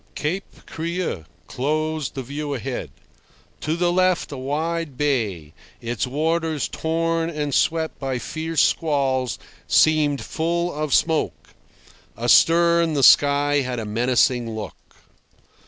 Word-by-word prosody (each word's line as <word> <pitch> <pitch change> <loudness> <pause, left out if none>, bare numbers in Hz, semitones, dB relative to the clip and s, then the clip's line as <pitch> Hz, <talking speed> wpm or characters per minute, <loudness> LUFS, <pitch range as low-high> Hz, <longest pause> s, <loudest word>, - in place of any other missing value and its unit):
Cape 180 +6 -4
Creux 165 - -4 0.2
closed 155 +4 -2
the 135 - -4
view 145 +2 -4
ahead. 125 - -5 0.7
To 155 - -2
the 175 0 +1
left 185 -2 +1
a 140 - -6
wide 150 +2 -3
bay, 105 - -1 0.3
its 120 0 -3
waters 160 +2 -1
torn 165 0 -1
and 150 -3 -3
swept 160 +3 0
by 135 -2 -2
fierce 160 +4 -1
squalls, 135 -5 0 0.3
seemed 150 -3 +3
full 170 +2 -2
of 150 -1 -3
smoke. 160 -2 0 0.7
Astern 170 +7 +4
the 140 - +1
sky 145 +1 +5
had 130 -3 -1
a 115 - -4
menacing 120 +1 +1
look. 110 -1 -9
150 Hz, 120 wpm, -22 LUFS, 130-165 Hz, 0.7 s, sky